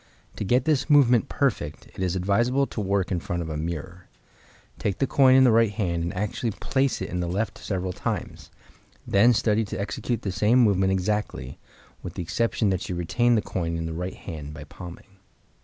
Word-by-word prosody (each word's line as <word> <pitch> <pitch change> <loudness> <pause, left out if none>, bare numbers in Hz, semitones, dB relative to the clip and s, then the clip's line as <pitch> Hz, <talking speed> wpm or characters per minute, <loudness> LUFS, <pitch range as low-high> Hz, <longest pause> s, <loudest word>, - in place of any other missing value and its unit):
To - - -2
get 125 +6 +2
this 150 -2 +1
movement 125 -6 +5
perfect, 100 - -1
it - - -13
is 95 -1 0
advisable 120 +9 +2
to 115 - -5
work 100 -1 0
in 90 - 0
front 85 +1 -3
of 80 - -6
a - - -3
mirror. 85 +3 -5 0.7
Take 100 - -1
the 135 - +1
coin 130 -1 +5
in 130 - +7
the 125 - +6
right 115 -1 +4
hand 90 -6 -1
and 85 +1 -2
actually 105 +4 -2
place 135 +5 -1
it - - -5
in 90 - -2
the 90 - -1
left 100 +6 -2
several 95 -2 -3
times; - - -4 0.6
then 105 +5 +5
study 110 -1 +2
to - - -5
execute 115 +2 -3
the 95 - -2
same 105 +5 +3
movement 95 -6 +4
exactly, 95 -8 -2 0.4
with - - -7
the - - -3
exception 110 +3 0
that 90 -2 -2
you 90 - -2
retain 120 +8 +2
the 110 - +1
coin 85 -2 -2
in 80 - -3
the 80 - -4
right 90 +3 -4
hand 75 -4 -8
by 75 - -8
palming. 90 +4 -12
100 Hz, 205 wpm, -25 LUFS, 90-115 Hz, 0.7 s, in